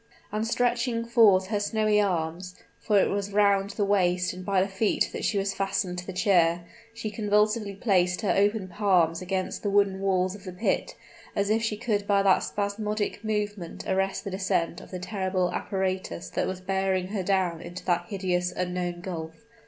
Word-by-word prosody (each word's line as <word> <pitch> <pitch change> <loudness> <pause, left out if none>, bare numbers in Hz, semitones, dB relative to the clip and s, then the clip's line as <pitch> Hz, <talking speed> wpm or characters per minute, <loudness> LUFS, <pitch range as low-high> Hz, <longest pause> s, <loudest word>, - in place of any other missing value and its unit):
And 215 +2 -1
stretching 240 0 0
forth 220 -6 +5
her 210 -2 0
snowy 210 0 +2
arms 180 -1 -2 0.2
(for 210 -3 +3
it - - +2
was 200 0 -2
round 200 -1 +3
the 205 0 -1
waist 180 -2 +2
and 185 +1 -8
by 195 0 +1
the 190 - +2
feet 200 +2 0
that - - -4
she 210 - +1
was 195 0 0
fastened 195 -2 -1
to 180 - -9
the - - -3
chair), 175 -3 +2 0.3
she 230 -2 -5
convulsively 210 0 +1
placed 180 -4 +1
her 205 - +1
open 205 0 +2
palms 180 -4 +2
against 185 0 -3
the 205 - -1
wooden 200 -1 +2
walls 185 -1 +1
of 200 -1 -11
the 185 -3 -7
pit, 180 +6 -1 0.4
as 200 +1 +1
if 225 +1 +2
she 225 -2 -1
could 210 -3 -1
by 200 -1 +3
that 195 -1 +5
spasmodic 210 +1 -2
movement 210 -5 -3
arrest 195 0 0
the 200 - -5
descent 185 -3 -1
of - - -13
the 185 - -5
terrible 185 -1 -1
apparatus 190 -3 -3
that - - -1
was 185 0 -4
bearing 190 -1 0
her 200 -1 -2
down 185 -3 0
into 175 +1 -8
that 175 -1 +1
hideous, 180 -3 -1
unknown 180 -1 -2
gulf! 165 +2 -7
195 Hz, 185 wpm, -27 LUFS, 180-210 Hz, 0.4 s, forth